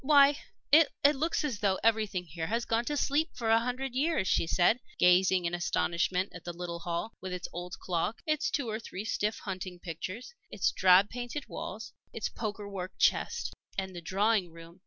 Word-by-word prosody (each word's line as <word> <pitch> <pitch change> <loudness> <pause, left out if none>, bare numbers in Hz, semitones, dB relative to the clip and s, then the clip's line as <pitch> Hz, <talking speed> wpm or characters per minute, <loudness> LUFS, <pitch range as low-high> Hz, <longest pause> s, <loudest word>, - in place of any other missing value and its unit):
"Why, 285 0 +6 0.3
it 310 +2 +7 0.3
looks 320 +4 0
as 260 -9 -2
though 195 -2 +2
everything 215 -5 +1
here 160 0 -5
had 230 +3 -1
gone 230 +1 0
to 295 +2 -1
sleep 295 +4 +1
for 225 -3 0
a 225 - +6
hundred 250 +2 -3
years," 285 - +1
she - - +2
said, 180 +8 +3 0.2
gazing 180 0 +4
in 170 - -1
astonishment 175 +2 0
at 180 - -10
the 175 - -5
little 175 -1 -4
hall, 170 +6 -3
with 185 - -5
its 180 -1 -4
old 175 +1 -6
clock, 185 +5 -2
its 305 -1 +1
two 280 -5 -1
or 215 0 -2
three 210 -3 -7
stiff 215 -1 -1
hunting 185 -2 -6
pictures, 185 - -6 0.2
its 185 - +1
drab 185 - +5
painted 245 +4 -5
walls, - - -6 0.2
its - - -2
poker 210 -2 -5
work 190 -2 -5
chest. 475 +1 +1 0.2
And 190 -1 -3
the 175 - -6
drawing 195 +2 +1
room! 165 +2 -13
200 Hz, 190 wpm, -30 LUFS, 180-240 Hz, 0.3 s, it